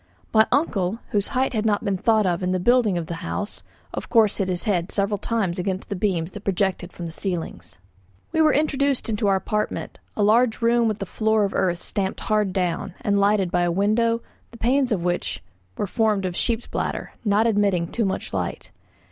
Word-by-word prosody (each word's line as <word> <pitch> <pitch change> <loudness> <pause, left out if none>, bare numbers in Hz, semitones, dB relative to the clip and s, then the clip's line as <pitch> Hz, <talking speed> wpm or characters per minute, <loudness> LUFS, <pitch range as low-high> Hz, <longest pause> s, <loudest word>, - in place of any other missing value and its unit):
My 220 0 +6
uncle, 225 - +1
whose 205 -3 +1
height 260 0 0
had 215 -2 0
not 215 0 +1
been 200 -2 +1
thought 215 +2 +2
of 175 -1 0
in 180 - -1
building 240 -4 +4
the 160 - -6
house, 205 +1 -4 0.3
of - - -5
course 220 -3 +4
hit 195 - 0
his 175 -1 -1
head 180 -3 0
several 200 0 0
times 195 -7 -1
against 190 +1 -3
the 200 - -2
beams 180 -3 -1
that 205 - -9
projected 190 -2 -1
from 175 - -7
the 165 - -5
ceilings. 165 - -5 0.5
We 320 - +2
were 310 -1 +5
introduced 280 -4 +1
into 210 -1 0
our 195 - +4
apartment, 210 +2 -2 0.2
a 210 - +2
large 225 +3 +3
room 235 0 +3
with 215 -1 -1
a - - -5
floor 220 +3 +1
of 195 - -3
earth 175 -2 +1
stamped 190 +2 -3
hard 210 -2 +1
down, 180 0 -2
and 200 -1 +1
lighted 200 -3 +2
by 175 - +2
a 175 0 +2
window, 230 +5 +1 0.3
the 230 - -13
panes 255 +3 +2
of 185 -6 0
which 175 - -2 0.3
were - - 0
formed 210 -1 +1
of 180 -1 -3
sheep's 235 +4 0
bladder, - - -3
not 210 0 +3
admitting 200 -6 +2
too 235 - 0
much 190 -2 -2
light. - - -3
205 Hz, 200 wpm, -23 LUFS, 185-225 Hz, 0.5 s, My